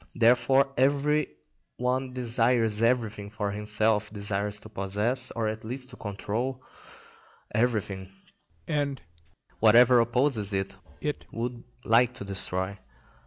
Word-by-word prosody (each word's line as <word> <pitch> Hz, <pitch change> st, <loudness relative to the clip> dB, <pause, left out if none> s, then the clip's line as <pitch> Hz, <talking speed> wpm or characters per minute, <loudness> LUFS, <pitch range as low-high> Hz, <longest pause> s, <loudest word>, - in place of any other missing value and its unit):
Therefore 130 Hz, +3 st, +4 dB
every 145 Hz, +3 st, +2 dB, 0.5 s
one 130 Hz, +1 st, -1 dB
desires 115 Hz, -3 st, +2 dB
everything 115 Hz, -4 st, 0 dB
for 105 Hz, -1 st, -3 dB
himself, 105 Hz, 0 st, 0 dB
desires 105 Hz, 0 st, -2 dB
to -, -, -11 dB
possess, 105 Hz, +6 st, -1 dB
or 115 Hz, -2 st, 0 dB
at 110 Hz, 0 st, -4 dB
least 130 Hz, +3 st, -3 dB
to -, -, -10 dB
control, 115 Hz, +5 st, -3 dB, 0.9 s
everything, 105 Hz, -5 st, -1 dB, 0.6 s
and 145 Hz, -2 st, -1 dB, 0.6 s
whatever 120 Hz, +3 st, +7 dB
opposes 115 Hz, -3 st, +2 dB
it 95 Hz, 0 st, -2 dB, 0.3 s
it 150 Hz, -1 st, -4 dB
would 120 Hz, +1 st, -4 dB, 0.2 s
like 120 Hz, +2 st, +4 dB
to 100 Hz, -, -7 dB
destroy. 95 Hz, 0 st, -2 dB
115 Hz, 115 wpm, -27 LUFS, 105-125 Hz, 0.9 s, whatever